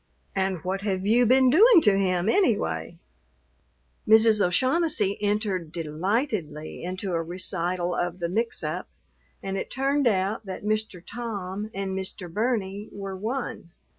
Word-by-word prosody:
And 190 Hz, -3 st, -1 dB
what 190 Hz, +1 st, -2 dB
have 195 Hz, -2 st, -2 dB
you 235 Hz, +3 st, +4 dB
been 260 Hz, +1 st, +5 dB
doing 420 Hz, -, +7 dB
to 210 Hz, -8 st, +4 dB
him, 185 Hz, -1 st, +1 dB
anyway?" 205 Hz, -, +1 dB, 1.1 s
Mrs. 220 Hz, -1 st, +6 dB
O'Shaughnessy 255 Hz, -, +2 dB
entered 205 Hz, -5 st, -1 dB
delightedly 165 Hz, -, -2 dB
into 185 Hz, +1 st, -4 dB
a 165 Hz, -, +1 dB
recital 175 Hz, 0 st, -1 dB
of 175 Hz, 0 st, -2 dB
the 175 Hz, -, -3 dB
"mixup," 225 Hz, +7 st, -2 dB, 0.6 s
and 195 Hz, 0 st, -3 dB
it -, -, -5 dB
turned 275 Hz, +1 st, +1 dB
out 200 Hz, +1 st, 0 dB
that 190 Hz, +2 st, -6 dB
Mr. 215 Hz, -4 st, -1 dB
Tom 205 Hz, -3 st, -5 dB
and 195 Hz, -1 st, -4 dB
Mr. 190 Hz, -2 st, -4 dB
Burney 210 Hz, -2 st, -1 dB
were 195 Hz, -1 st, -6 dB
one. 215 Hz, -4 st, -5 dB
195 Hz, 135 wpm, -26 LUFS, 180-225 Hz, 1.1 s, doing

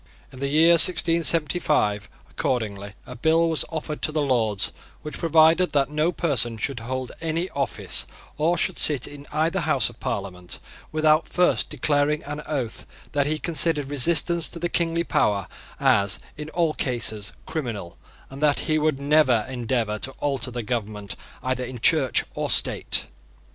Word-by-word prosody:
In 130 Hz, -, -11 dB
the 140 Hz, -, -2 dB
year 155 Hz, +4 st, +4 dB
1675, 165 Hz, -, +2 dB, 0.2 s
accordingly, 105 Hz, -7 st, -3 dB
a 125 Hz, -, -9 dB
bill 160 Hz, +6 st, +2 dB
was 160 Hz, -2 st, +1 dB
offered 155 Hz, -1 st, -5 dB
to -, -, -1 dB
the 155 Hz, -, -1 dB
Lords 115 Hz, -7 st, +1 dB, 0.3 s
which 150 Hz, -2 st, -7 dB
provided 165 Hz, +2 st, +3 dB
that 140 Hz, 0 st, +1 dB
no 155 Hz, +3 st, +1 dB
person 130 Hz, -10 st, 0 dB
should 135 Hz, +2 st, -3 dB
hold 130 Hz, +2 st, -5 dB
any 165 Hz, +3 st, -2 dB
office, 140 Hz, -1 st, -1 dB, 0.3 s
or 165 Hz, +4 st, +1 dB
should 185 Hz, +2 st, 0 dB
sit 145 Hz, -5 st, +3 dB
in 145 Hz, 0 st, -12 dB
either 160 Hz, +5 st, 0 dB
House 150 Hz, -, +1 dB
of 120 Hz, -, -21 dB
Parliament, 90 Hz, -3 st, -5 dB, 0.3 s
without 155 Hz, 0 st, +2 dB
first 180 Hz, 0 st, +1 dB
declaring 150 Hz, +1 st, 0 dB
on 145 Hz, +1 st, -6 dB
oath 130 Hz, -7 st, -4 dB, 0.3 s
that 145 Hz, -1 st, 0 dB
he 155 Hz, +1 st, -1 dB
considered 155 Hz, -3 st, +2 dB
resistance 165 Hz, +4 st, +3 dB
to -, -, -7 dB
the 175 Hz, +1 st, -2 dB
kingly 170 Hz, -1 st, 0 dB
power 100 Hz, -, 0 dB, 0.3 s
as 100 Hz, -1 st, +2 dB, 0.2 s
in 150 Hz, +1 st, -8 dB
all 165 Hz, -1 st, 0 dB
cases 115 Hz, -6 st, -1 dB
criminal, 115 Hz, -, -5 dB, 0.4 s
and 135 Hz, +2 st, -10 dB
that 150 Hz, -2 st, +2 dB
he 155 Hz, 0 st, 0 dB
would 150 Hz, -2 st, 0 dB
never 140 Hz, -6 st, +3 dB
endeavour 120 Hz, -4 st, -2 dB
to 135 Hz, -, -2 dB
alter 135 Hz, -3 st, -3 dB
the 120 Hz, -1 st, -5 dB
government 105 Hz, -3 st, -4 dB, 0.3 s
either 130 Hz, 0 st, -2 dB
in 125 Hz, 0 st, -7 dB
Church 135 Hz, -1 st, +4 dB
or -, -, -3 dB
State. -, -, +4 dB
145 Hz, 160 wpm, -23 LUFS, 120-160 Hz, 0.4 s, year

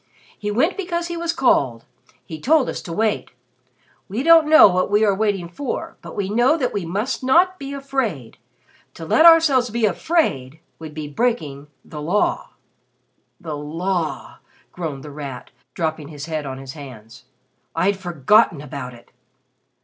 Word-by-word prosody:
He 210 Hz, -, -5 dB
went 265 Hz, -, +1 dB
because 345 Hz, -3 st, -3 dB
he 345 Hz, -, -4 dB
was 335 Hz, 0 st, -1 dB
called. 135 Hz, -, +1 dB, 0.4 s
He 160 Hz, -2 st, -8 dB
told 300 Hz, -2 st, +3 dB
us -, -, -5 dB
to 170 Hz, -, -9 dB
wait. 215 Hz, +4 st, -1 dB, 0.8 s
We 220 Hz, +7 st, -3 dB
don't 325 Hz, -1 st, +6 dB
know 315 Hz, -6 st, +9 dB
what 185 Hz, -1 st, 0 dB
we 210 Hz, +2 st, +3 dB
are 200 Hz, -, +3 dB
waiting 195 Hz, -3 st, -1 dB
for, 240 Hz, +10 st, -5 dB
but -, -, -10 dB
we 200 Hz, -2 st, -2 dB
know 240 Hz, +9 st, +3 dB
that 255 Hz, -6 st, -1 dB
we 195 Hz, -5 st, -3 dB
must 210 Hz, +10 st, -3 dB
not 355 Hz, +8 st, +3 dB
be 275 Hz, -1 st, -6 dB
afraid. 265 Hz, -, -3 dB, 0.6 s
To 165 Hz, -, -8 dB
let 315 Hz, -, +6 dB
ourselves 295 Hz, -7 st, +5 dB
be 230 Hz, 0 st, 0 dB
afraid 165 Hz, -, 0 dB, 0.2 s
would 155 Hz, -2 st, -9 dB
be 155 Hz, -1 st, -5 dB
breaking 150 Hz, -, -2 dB, 0.2 s
the 150 Hz, -2 st, -8 dB
Law." 180 Hz, +8 st, 0 dB, 0.9 s
"The 160 Hz, -5 st, -6 dB
Law!" 165 Hz, +3 st, -3 dB, 0.3 s
groaned 155 Hz, -6 st, -6 dB
The 150 Hz, -, -9 dB
Rat, 140 Hz, -3 st, -8 dB, 0.2 s
dropping 160 Hz, -3 st, -3 dB
his 150 Hz, -1 st, -8 dB
head 155 Hz, -3 st, -4 dB
on 130 Hz, -1 st, -6 dB
his 135 Hz, 0 st, -9 dB
hands, 125 Hz, -5 st, -12 dB, 0.5 s
"I'd 190 Hz, +5 st, +2 dB
forgotten 175 Hz, -, +3 dB
about 140 Hz, -3 st, -7 dB
it." 120 Hz, -, -19 dB
190 Hz, 160 wpm, -21 LUFS, -, 0.9 s, know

